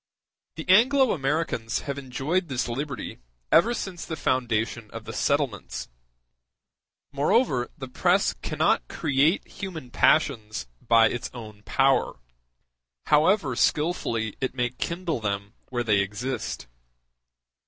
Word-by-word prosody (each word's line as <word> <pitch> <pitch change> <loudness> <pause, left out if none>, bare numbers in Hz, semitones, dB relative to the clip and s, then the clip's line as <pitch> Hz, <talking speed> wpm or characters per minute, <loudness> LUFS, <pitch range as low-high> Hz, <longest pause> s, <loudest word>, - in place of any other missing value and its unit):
The 160 - -7
Anglo 250 +7 +5
Americans 135 -6 -1
have 140 0 -4
enjoyed 140 +7 -1
this 130 -4 -2
liberty 135 +3 -4 0.3
ever 225 +8 +5
since 185 -5 -5
the 160 - -5
foundation 115 -5 -1
of 115 0 -8
the 110 - -7
settlements; 140 - -1 1.2
moreover, 140 - +2
the 135 -3 -6
press 125 - +2
cannot - - +1
create 145 +6 +1
human 160 -10 -7
passions 110 - +2 0.2
by 115 -1 +5
its 120 - -4
own 110 -3 -9
power, 135 0 +2 0.9
however 150 - +3
skillfully 120 - 0
it 130 -1 -2
may 125 -1 0
kindle 170 +3 -3
them 100 0 -3 0.2
where 120 -2 -1
they 105 -3 +3
exist. 110 - -3
130 Hz, 115 wpm, -26 LUFS, 115-160 Hz, 1.2 s, Anglo